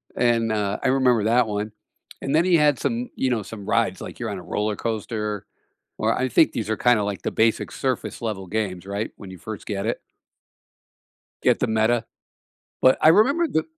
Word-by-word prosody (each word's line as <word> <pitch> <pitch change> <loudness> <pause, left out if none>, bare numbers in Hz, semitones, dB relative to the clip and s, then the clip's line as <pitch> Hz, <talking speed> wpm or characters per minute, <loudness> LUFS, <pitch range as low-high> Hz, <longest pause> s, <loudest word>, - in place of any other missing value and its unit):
and, 115 -2 +2
uh, 100 -2 -1
I - - 0
remember 125 -5 +3
that 120 +1 +4
one, 105 0 -3 0.5
and 135 - -2
then 165 +3 +4
he 180 -2 +4
had 150 -4 +3
some, 125 -2 -2
you 130 - +1
know, 115 -4 0
some 100 -1 -9
rides, - - +1
like - - -8
you're - - -3
on - - -4
a - - -7
roller 105 0 -2
coaster, 105 -2 -3 0.5
or - - +1
I 130 0 0
think - - +4
these 110 -2 -3
are 110 - 0
kinda 120 -3 +3
like 100 -1 -3
the - - -1
basic 110 0 +1
surface 130 -2 -3
level 100 -5 -4
games, 95 -3 -3
right, 100 +2 -3
when 100 -3 -10
you 95 - -9
first 110 +3 -8
get 100 0 -3
it. 115 - -1 1.4
Get - - +3
the 125 - +2
Meta. 110 +1 +1 0.8
But 130 - +6
I 155 - +7
remember 280 - +4
the 160 - 0
110 Hz, 200 wpm, -23 LUFS, 105-125 Hz, 1.4 s, I